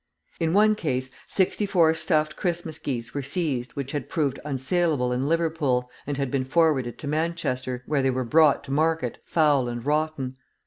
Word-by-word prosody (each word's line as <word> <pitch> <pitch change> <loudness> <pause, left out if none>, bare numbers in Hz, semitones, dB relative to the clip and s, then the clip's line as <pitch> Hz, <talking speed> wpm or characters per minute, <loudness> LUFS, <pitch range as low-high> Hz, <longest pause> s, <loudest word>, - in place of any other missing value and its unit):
In 165 -1 +1
one 215 +2 +5
case, 130 -9 -2 0.2
sixty 200 +2 +1
four 165 -5 +4
stuffed 155 -2 0
Christmas 170 -4 -2
geese 120 -6 -4
were 145 - -2
seized 140 -3 -2
which 140 -1 -4
had 145 -3 -4
proved 145 -6 -1
unsaleable 140 -1 0
in 130 +3 -1
Liverpool, 155 -7 0 0.2
and 145 -2 -2
had 135 -2 -2
been 135 -2 0
forwarded 135 -4 +1
to 145 - -7
Manchester, 145 -5 -2
where 145 -2 +1
they 135 - +2
were 130 0 0
brought 150 +3 +4
to 140 - -8
market 155 -3 0
foul 145 -6 +2
and 120 0 -5
rotten. 150 -3 -1
145 Hz, 175 wpm, -25 LUFS, 130-160 Hz, 0.2 s, one